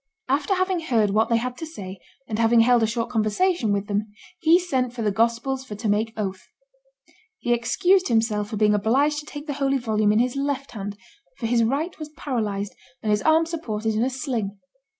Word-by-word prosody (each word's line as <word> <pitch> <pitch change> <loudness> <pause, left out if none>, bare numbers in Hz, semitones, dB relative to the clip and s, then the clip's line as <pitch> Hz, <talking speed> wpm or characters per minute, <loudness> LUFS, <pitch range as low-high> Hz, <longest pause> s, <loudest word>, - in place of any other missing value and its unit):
After 285 +8 +1
having 370 -1 +1
heard 230 -10 +1
what 215 +2 +2
they 230 - +3
had 245 +2 -3
to 325 - -4
say, 195 - -8 0.3
and 220 -1 -3
having 230 0 +5
held 240 0 +4
a 225 - +3
short 230 +1 -2
conversation 225 - +1
with 200 0 0
them, 205 +1 -1 0.3
he 330 0 +5
sent 260 -9 -1
for 235 -2 -4
the 210 - +2
Gospels 235 +5 0
for 220 -6 -8
to 215 +2 -4
make 215 +2 +1
oath. 190 -3 -4 0.9
He 240 - 0
excused 360 +11 +2
himself 220 -3 +1
for 215 - -4
being 210 0 +4
obliged 270 +9 +2
to 295 - -11
take 290 0 -8
the 295 - -3
holy 275 0 +2
volume 215 -4 +1
in 210 - +2
his 245 +2 +1
left 275 0 -2
hand, 205 -2 -6 0.4
for - - -4
his 230 0 +3
right 285 +10 -1
was 305 -1 -6
paralyzed 210 -9 -2 0.3
and 215 - +1
his 210 -1 +2
arm 320 +1 +4
supported 225 -10 -3
in 215 - 0
a 250 - +2
sling. 245 -7 -3
235 Hz, 210 wpm, -24 LUFS, 215-280 Hz, 0.9 s, having